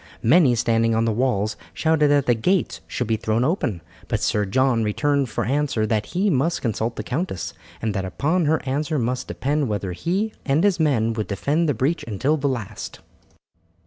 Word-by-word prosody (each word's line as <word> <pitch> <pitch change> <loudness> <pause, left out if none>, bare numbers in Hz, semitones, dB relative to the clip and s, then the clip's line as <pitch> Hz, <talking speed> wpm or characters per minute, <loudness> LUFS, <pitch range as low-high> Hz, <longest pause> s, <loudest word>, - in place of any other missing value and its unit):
Many 135 0 +5
standing 115 0 +2
on 115 +1 +2
the 115 - +1
walls 110 -3 0 0.2
shouted 160 -2 +3
that 145 -1 +3
the 120 - +4
gates 180 - 0
should 125 - -2
be 110 0 0
thrown 110 +2 0
open; 120 - -1 0.2
but - - -1
Sir 105 -1 +1
John 120 +3 +2
returned 140 +5 +1
for - - -2
answer 135 -4 0
that 110 -1 0
he 190 +4 0
must 155 +4 0
consult 115 0 -1
the 110 - -4
countess, 110 - -3 0.3
and 110 -2 0
that 95 -1 -2
upon 155 - 0
her 155 +2 +1
answer 150 +4 -1
must 125 0 -1
depend 145 +1 -1
whether 100 -3 -2
he 190 - -1
and 145 +4 +1
his 200 -4 +3
men 120 -8 +2
would 110 -2 -3
defend 150 - 0
the 145 - +1
breach 140 +9 0
until 130 +8 +1
the 140 -2 0
last. 120 -7 -5
130 Hz, 190 wpm, -23 LUFS, 110-150 Hz, 0.3 s, Many